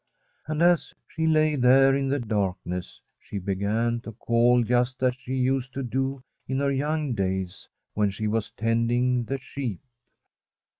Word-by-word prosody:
And 155 +1 0
as 175 -1 +3
she 160 0 -2
lay 155 -1 +3
there 135 +1 +5
in 135 0 0
the 140 - +1
darkness 95 -6 -3 0.2
she 105 - -7
began 105 +5 -1
to 115 -1 -9
call 120 +3 +3
just 125 +3 0
as 125 -1 +3
she 130 +1 -6
used 130 0 0
to 135 - -2
do 130 +2 -2 0.2
in 130 - -1
her 140 0 +1
young 145 0 -1
(kiys 95 -1 -3 0.3
when 105 -1 +2
she 100 +2 -4
was 110 0 -1
tending 120 +2 +1
the 135 +4 -2
sheep. 130 -6 -5
125 Hz, 155 wpm, -26 LUFS, 110-135 Hz, 0.3 s, there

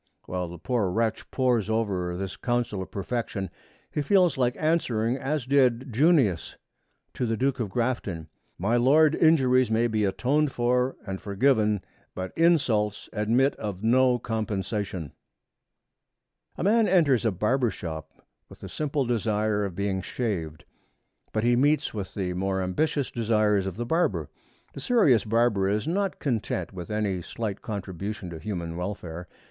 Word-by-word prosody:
While 90 -1 -3
the 85 +1 -9
poor 110 +1 0
wretch 110 +3 -1
pores 125 -5 +1
over 95 -6 -1
this 95 0 -4
counsel 120 -5 -1
of 95 - -7
perfection, 100 -1 -3 0.4
he 150 - -1
feels 180 +2 +3
like 125 -1 +1
answering 125 -8 +1
as 135 +1 -2
did 130 -2 +2
Junius 135 - +2 0.6
to 125 - -2
the 115 0 -1
Duke 135 +2 0
of 110 -4 -2
Grafton, 105 -8 -2 0.3
'My 110 +7 +1
Lord, 150 +5 +5
injuries 130 -7 +4
may 115 +1 +2
be 110 -2 0
atoned 135 +9 +1
for 125 +1 +1
and 95 -2 -5
forgiven, 105 -1 +2 0.3
but 95 0 -5
insults 130 -12 +2
admit 115 +6 +2
of 105 -2 -5
no 125 +2 +4
compensation.' 105 - -3 1.5
A - - -3
man 220 +3 +4
enters 150 -10 +3
a 115 - +3
barber's 115 +6 0
shop 80 -2 -8 0.3
with - - -15
the - - -7
simple 145 -2 -1
desire 110 -3 0
of 95 -4 -4
being 100 -1 -1
shaved. 90 -9 -4 0.7
But 110 - -1
he 120 +1 +4
meets 145 +3 +2
with 100 -3 -6
the 90 -3 -2
more 95 +1 -1
ambitious 140 +9 -1
desires 105 -4 +1
of 95 - -4
the 120 +3 -3
barber. 165 +8 0 0.4
The - - -8
serious 195 - +3
barber 110 -3 +2
is 105 +7 -1
not 195 +3 0
content 110 - -2
with 90 -2 -7
any 105 -4 -1
slight 105 +3 -5
contribution 100 -2 -5
to 80 - -7
human 85 -3 -4
welfare. 90 -2 -5
110 Hz, 150 wpm, -26 LUFS, 95-130 Hz, 1.5 s, Lord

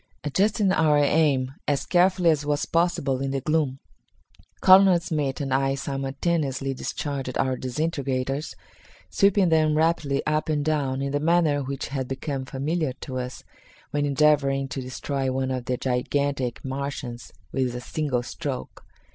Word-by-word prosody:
Adjusting 200 +6 +2
our 155 -4 +3
aim 145 -3 +2
as 140 -2 0
carefully 180 -1 +4
as 150 -2 0
was 145 0 0
possible 160 -6 0
in 135 - -1
the 135 0 -1
gloom, 150 -2 0 0.8
Colonel 190 -1 +7
Smith 150 -5 -2
and 135 -2 -2
I 135 0 +2
simultaneously 135 0 -2
discharged 135 -1 -4
our 130 -1 +1
disintegrators, 135 0 -2 0.6
sweeping 200 -2 +3
them 155 -1 +3
rapidly 155 -3 +1
up 155 +1 0
and 145 -2 0
down 140 -4 0
in 140 - -2
the 145 - 0
manner 155 -2 +2
which 135 0 -4
had 135 -2 -3
become 135 0 -4
familiar 145 +2 -2
to 130 -2 -4
us 125 0 -6 0.5
when 145 0 0
endeavoring 140 -1 +2
to 135 - -4
destroy 130 +1 -3
one 130 0 -1
of 130 -1 -3
the 125 -1 -1
gigantic 130 0 -1
Martians 130 -3 -5 0.2
with 130 -2 -1
a - - -3
single 130 -2 -2
stroke. 140 0 -6
140 Hz, 145 wpm, -25 LUFS, 130-155 Hz, 0.8 s, Colonel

